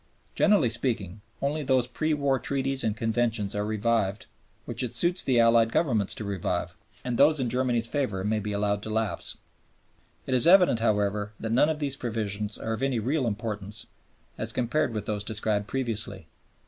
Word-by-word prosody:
Generally 195 - +3
speaking, 110 -5 -2 0.2
only 150 +3 0
those 130 -3 +2
pre 155 +4 -1
war 140 -2 +1
treaties 135 +1 0
and 110 -1 -1
conventions 115 -2 0
are 105 - -1
revived 105 -1 0 0.4
which - - -2
it 125 -1 -2
suits 175 +9 +2
the 125 -3 +2
Allied 115 0 +5
Governments 115 - +1
to - - -4
revive, 90 -3 -2 0.3
and 125 -2 -2
those 150 +1 +5
in 125 -3 -1
Germany's 125 -2 +1
favor 115 -8 -1
may 105 +1 0
be 105 0 -4
allowed 100 0 0
to 110 - -6
lapse. 110 0 -2 0.9
It 130 - -2
is 125 +4 +4
evident, 180 -9 +6
however, 105 -1 0
that 110 - -3
none 130 +6 +4
of 160 - -1
these 140 -2 -3
provisions 105 -3 -3
are 115 - -3
of 110 - -3
any 135 -2 +1
real 130 +4 0
importance, 105 -1 -4 0.5
as - - -2
compared 130 +3 0
with 105 -2 -4
those 105 -1 -2
described 105 -1 0
previously. 110 -8 -2
115 Hz, 175 wpm, -27 LUFS, 105-130 Hz, 0.9 s, evident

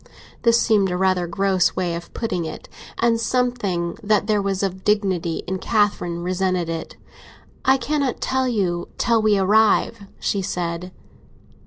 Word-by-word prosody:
This 235 0 +4
seemed 205 -5 +3
a 180 - -1
rather 185 -1 +1
gross 190 0 +1
way 180 -2 -1
of 170 +1 -7
putting 185 -7 -2
it, 160 -1 -7 0.3
and 230 -1 +2
something 230 -9 -1
that 210 -1 +2
there 210 -1 +1
was 195 -1 -1
of 190 -1 -3
dignity 190 -6 0
in 190 +1 -3
Catherine 195 -5 0
resented 185 -1 -1
it. 165 -1 -5 0.7
"I 265 0 +5
cannot 280 -2 -1
tell 260 0 0
you 185 -7 -1
till 230 -2 +2
we 215 -1 +3
arrive," 205 0 +2
she 200 - -1
said. 180 -1 -3
195 Hz, 150 wpm, -22 LUFS, 180-220 Hz, 0.7 s, I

